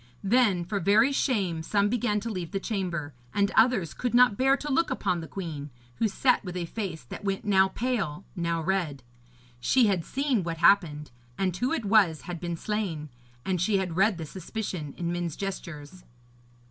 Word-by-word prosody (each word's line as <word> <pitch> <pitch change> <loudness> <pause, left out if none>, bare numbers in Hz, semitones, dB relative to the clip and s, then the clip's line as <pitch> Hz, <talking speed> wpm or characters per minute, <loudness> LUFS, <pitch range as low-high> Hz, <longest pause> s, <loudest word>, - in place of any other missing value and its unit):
Then 200 -5 +3
for 200 +3 -2
very 210 +9 +4
shame 200 - 0
some 200 +5 +1
began 215 -2 0
to 230 - -4
leave 180 -2 -5
the 195 - 0
chamber; 175 -9 -3 0.2
and 200 0 +2
others 225 -9 +3
could 245 -1 -2
not 245 -3 +6
bear 270 +4 +3
to 295 +1 -5
look 320 +5 +2
upon 180 -10 -1
the 160 - -7
queen, 155 -7 -6 0.3
who 225 - +2
sat 250 +5 +2
with 180 -2 -5
a 175 - -2
face 180 - -5
that 120 - -9
went 195 0 -2
now 190 -2 +5
pale, 200 -7 -2
now 170 -2 -1
red. 165 -7 -1 0.6
She 250 - +4
had 190 -5 +1
seen 270 - 0
what 165 -1 -3
happened, 160 -5 +3 0.3
and 185 -3 0
who 245 +8 -1
it 285 -9 -1
was 195 -7 +4
had 175 -2 -6
been 170 -1 -4
slain, 180 -7 -3 0.4
and 185 -3 0
she 200 +2 +2
had 185 -4 -2
read 195 +1 +3
the 165 - -5
suspicion 180 -3 -5
in 170 0 -2
men's 175 -3 -3
gestures. 180 -4 -6
190 Hz, 185 wpm, -27 LUFS, 170-220 Hz, 0.6 s, not